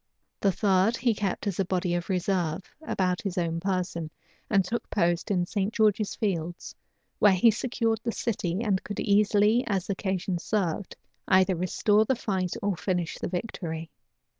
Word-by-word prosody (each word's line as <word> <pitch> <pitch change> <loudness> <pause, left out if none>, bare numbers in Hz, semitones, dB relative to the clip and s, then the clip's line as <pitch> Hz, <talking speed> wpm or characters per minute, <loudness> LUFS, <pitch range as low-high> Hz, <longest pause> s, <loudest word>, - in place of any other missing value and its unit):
The 200 - +3
third 195 +3 +2
he 235 -1 +2
kept 205 -3 -2
as 200 -3 -2
a 195 - +2
body 180 -1 0
of 175 +1 -2
reserve 180 -3 0 0.2
about 185 - -1
his 195 -2 -4
own 165 -1 0
person, 180 -3 -2 0.4
and 195 -3 +3
took 235 +6 -3
post 175 -1 +1
in 180 -3 +1
St. 200 +2 -1
George's 215 -2 +2
Fields; 175 -4 -3 0.5
where 205 -2 +6
he 205 +5 +5
secured 230 -1 -1
the 230 - -1
city, 195 -5 -2
and 195 -4 0
could 205 - -5
easily, 210 +3 +3
as 195 -2 -1
occasion 190 -2 -2
served, 190 -2 -2 0.3
either 190 0 +4
restore 205 +4 +2
the 260 +4 +1
fight 190 -6 -2
or 200 -2 +1
finish 175 -2 -2
the - - -2
victory. 170 -4 -4
190 Hz, 165 wpm, -27 LUFS, 175-210 Hz, 0.5 s, where